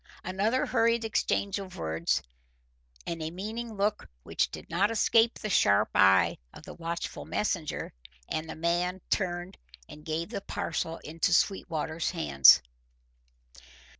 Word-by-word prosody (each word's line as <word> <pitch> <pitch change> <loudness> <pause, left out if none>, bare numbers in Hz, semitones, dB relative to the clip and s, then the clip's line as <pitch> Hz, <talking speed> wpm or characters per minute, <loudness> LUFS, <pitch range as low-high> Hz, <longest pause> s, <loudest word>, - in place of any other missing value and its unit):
Another 205 +7 0
hurried 230 0 +2
exchange 200 -2 0
of 190 -2 -9
words 80 +1 -1 0.8
and 165 -1 -4
a 155 - -3
meaning 220 +6 -6
look 205 +1 -1
which - - 0
did - - -9
not 190 +5 +1
escape 230 +1 +3
the - - -5
sharp 105 - +3
eye 95 0 +4
of - - -13
the - - -9
watchful 170 0 -5
messenger, 180 -7 -2 0.3
and 155 +1 -4
the - - -6
man 175 +3 -1
turned 175 -2 -2 0.3
and 150 - -12
gave 160 +3 -3
the 220 - -4
parcel 165 -3 -3
into 165 +3 -1
Sweetwater's 165 -4 0
hands. 70 -4 +6
175 Hz, 135 wpm, -29 LUFS, 160-205 Hz, 0.8 s, hands